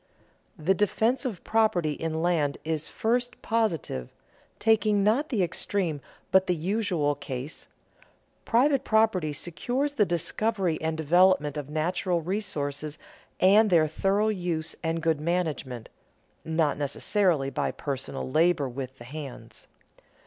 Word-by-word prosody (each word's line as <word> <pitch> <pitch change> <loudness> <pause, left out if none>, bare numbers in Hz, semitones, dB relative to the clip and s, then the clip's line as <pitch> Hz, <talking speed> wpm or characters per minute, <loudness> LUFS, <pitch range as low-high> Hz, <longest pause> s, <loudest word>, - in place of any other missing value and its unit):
The 165 +4 +2
defense 220 +6 +1
of 210 -9 -4
property 215 -8 +2
in 160 +2 -3
land 160 -5 +1
is 160 -1 -2
first 245 +2 -1
positive: 190 - -1 0.5
taking 215 -2 +3
not 240 +9 +2
the 215 -8 +1
extreme 170 -3 -1 0.3
but 190 0 +4
the 180 - +2
usual 175 -4 0
case, 135 0 -6 0.8
private 270 +4 +3
property 220 -8 +2
secures 245 - -2
the 215 -7 +3
discovery 175 +1 0
and 160 0 -1
development 160 -1 +3
of 145 -2 -5
natural 175 +3 0
resources 155 -6 -3 0.4
and 210 +4 +6
their 165 -4 +5
thorough 195 +7 +1
use 175 -5 -2
and 165 0 -2
good 160 -3 +1
management 155 -8 -2 0.6
(not 160 -2 0
necessarily 145 0 +1
by - - -1
personal 135 -1 -4
labor 155 +1 +2
with 130 +1 -6
the 120 - -11
hands). 140 0 -9
170 Hz, 125 wpm, -27 LUFS, 150-210 Hz, 0.8 s, and